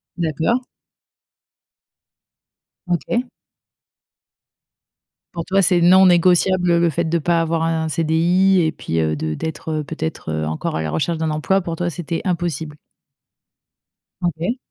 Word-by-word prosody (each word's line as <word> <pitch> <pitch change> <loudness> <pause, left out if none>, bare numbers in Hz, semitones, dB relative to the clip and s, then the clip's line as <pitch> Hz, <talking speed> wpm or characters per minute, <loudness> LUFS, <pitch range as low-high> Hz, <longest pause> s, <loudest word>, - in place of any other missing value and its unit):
D'accord. 165 - 0 2.3
OK. 235 +8 -1 2.1
Pour 170 -1 -4
toi, 195 +1 +2
c'est 175 -1 +3
non 185 +2 +6
négociable 180 +1 +3
le 170 0 +3
le 170 -1 +3
fait 170 +3 -1
de 170 +1 0
pas 170 +1 +1
avoir 165 0 -1
un 160 -1 -1
CDI 170 +5 +2
et 160 - +1
puis, 80 0 -3
heu, 80 -1 0
de 80 +1 -3
d'être, 160 - -5
heu, 155 -1 -1
peut-être, 80 - -5
heu, 80 0 -2
encore 80 0 -3
à 80 - -1
la 80 - -3
recherche 160 - -1
d'un 160 -1 -1
emploi. 190 +6 +1
Pour 170 -1 -4
toi, 175 +1 -2
c'était 170 0 -4
impossible? 165 -4 -2 1.4
OK. 175 - -1
165 Hz, 140 wpm, -20 LUFS, 155-175 Hz, 2.3 s, non